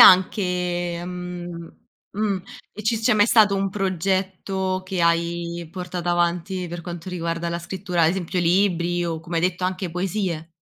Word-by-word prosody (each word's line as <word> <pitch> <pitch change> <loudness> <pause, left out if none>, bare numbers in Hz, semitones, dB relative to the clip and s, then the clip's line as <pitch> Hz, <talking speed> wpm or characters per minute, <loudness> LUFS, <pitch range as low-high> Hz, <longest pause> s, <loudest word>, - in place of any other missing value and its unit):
anche, 180 -2 +4
mhmm 175 -1 -6 0.4
mh. 200 -3 -1 0.3
E 210 - -8
ci 220 +1 +1
c'è 230 +2 +3
mai 205 0 +5
stato 215 -4 +6
un 195 0 +1
progetto 190 0 -1
che 185 -1 -2
hai 170 0 0
portato 180 -1 -4
avanti 175 +1 +1
per 175 0 -5
quanto 175 0 -7
riguarda 170 -1 -2
la 170 0 -2
scrittura, 175 0 -2
ad 160 - +6
esempio 180 0 -1
libri 175 -1 +2
o, 165 -2 -2
come 170 0 -4
hai 165 - +1
detto, 180 0 0
anche 185 -1 -2
poesie? 180 -2 -2
180 Hz, 160 wpm, -23 LUFS, 170-190 Hz, 0.4 s, stato